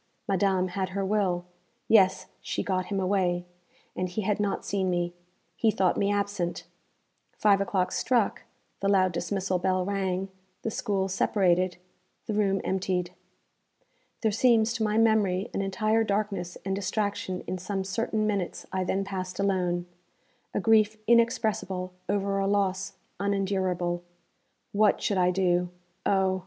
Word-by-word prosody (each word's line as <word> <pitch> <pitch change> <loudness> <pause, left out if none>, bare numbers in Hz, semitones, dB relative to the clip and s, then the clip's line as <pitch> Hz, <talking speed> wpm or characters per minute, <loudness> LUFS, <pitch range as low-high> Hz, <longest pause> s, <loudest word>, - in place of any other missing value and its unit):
Madame 190 -1 +2
had 185 +1 -2
her 195 - 0
will. 190 -4 0 0.4
Yes, 190 -4 +5 0.2
she - - -2
got 185 -2 -1
him 200 -2 -1
away, 185 -2 +1 0.5
and 185 0 -2
he 205 +4 -3
had 210 +1 0
not 205 -1 -1
seen 190 -2 0
me. 175 -1 -1 0.4
He 225 - +2
thought 190 -4 +2
me 200 0 +1
absent. 200 -4 -1 0.7
Five 200 -2 +4
o'clock 190 -2 0
struck, 240 -5 +1 0.4
the 200 - 0
loud 185 -2 +4
dismissal 185 +2 -1
bell 185 0 +1
rang, 195 -1 -1 0.3
the 225 - -1
school 200 -4 -1
separated, 185 -2 +2 0.5
the 220 - -3
room 195 -2 +1
emptied. 185 -2 -1 1.1
There 220 - +2
seems, 230 0 +3
to 230 -1 -1
my 215 0 +1
memory, 215 -3 +2
an - - -1
entire 215 +3 +1
darkness 200 -4 -2
and 195 0 0
distraction 200 -2 -2
in 185 - -3
some 195 +1 -3
certain 215 +2 -1
minutes 200 -4 -2
I 190 -1 0
then 190 +2 0
passed 185 -2 -5
alone 180 -3 +1 0.7
a - - -1
grief 215 0 +4
inexpressible 220 -6 +1 0.2
over 200 0 0
a 195 - +1
loss 195 -1 0 0.3
unendurable. 190 -3 0 0.7
What 210 0 +3
should 200 -3 0
I 180 0 +4
do 180 -1 +1 0.4
oh! 190 -1 +2
195 Hz, 145 wpm, -27 LUFS, 185-205 Hz, 1.1 s, Yes